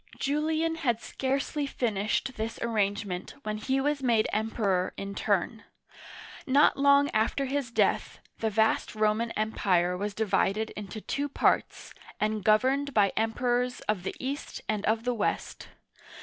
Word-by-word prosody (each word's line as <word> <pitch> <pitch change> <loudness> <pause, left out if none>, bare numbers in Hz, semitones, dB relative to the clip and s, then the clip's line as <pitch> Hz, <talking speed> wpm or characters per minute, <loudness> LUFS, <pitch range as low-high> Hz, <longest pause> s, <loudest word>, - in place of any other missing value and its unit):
Julian 315 +3 0
had 240 -8 0
scarcely 275 +4 -2
finished 225 +1 -1
this 220 +1 -4
arrangement 205 -4 -1
when 215 0 -3
he 265 +4 0
was 290 +1 0
made 230 -4 +2
Emperor 210 -4 0
in 195 - -5
his 200 - -7
turn. 210 +3 0 0.8
Not 280 +3 +5
long 280 +1 +4
after 225 +5 +1
his 270 -1 -2
death, 235 - +1 0.2
the 220 - 0
vast 220 +1 +1
Roman 215 +2 +1
Empire 185 -5 +1
was 205 +2 -3
divided 220 0 +1
into 210 +1 -7
two 285 +6 -2
parts, - - 0 0.3
and 215 -1 0
governed 260 +7 +2
by 200 -2 +4
Emperors 245 +2 0
of 210 -4 -1
the 180 - -4
East 275 +3 -4
and 210 -2 -1
of 220 +1 +1
the 245 0 0
West. 230 - -2
225 Hz, 145 wpm, -28 LUFS, 210-270 Hz, 0.8 s, Not